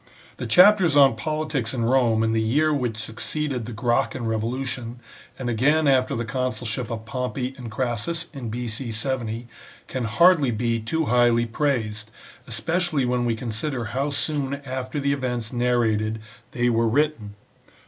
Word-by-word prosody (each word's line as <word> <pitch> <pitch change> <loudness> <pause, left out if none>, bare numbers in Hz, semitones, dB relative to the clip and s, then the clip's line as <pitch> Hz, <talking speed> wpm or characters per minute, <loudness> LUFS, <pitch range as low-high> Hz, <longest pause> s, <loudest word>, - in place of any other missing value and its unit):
The - - -4
chapters 185 -4 +6
on 140 -4 +6
politics 150 -2 -2
in 115 -2 0
Rome 115 -3 +3
in 110 - +1
the 110 0 +1
year 150 +8 +2
which 125 -6 -1
succeeded 120 +3 -3
the - - -6
Gracchan 120 +2 0
revolution, 120 +2 -3 0.4
and 130 - -5
again 145 +7 +2
after 130 -2 +3
the 115 0 -2
consulship 120 0 -2
of 110 -2 -5
Pompey 125 +2 -3
and 125 -4 -8
Crassus 125 +8 -2
in 130 -5 -6
B.C. 120 +1 -4
70, 115 -1 -2 0.4
can 130 -2 -3
hardly 150 +4 +4
be 115 0 0
too 160 +9 -1
highly 120 -1 +3
praised, 115 -4 -2 0.4
especially 140 +6 0
when 125 0 0
we 115 -1 +1
consider 120 +2 -3
how 135 +3 0
soon 145 -1 0
after 130 +2 -4
the 140 0 +1
events 125 -4 -3
narrated 110 -3 +1 0.3
they 120 0 0
were 115 -1 +2
written. 120 -5 0
125 Hz, 150 wpm, -24 LUFS, 115-140 Hz, 0.4 s, chapters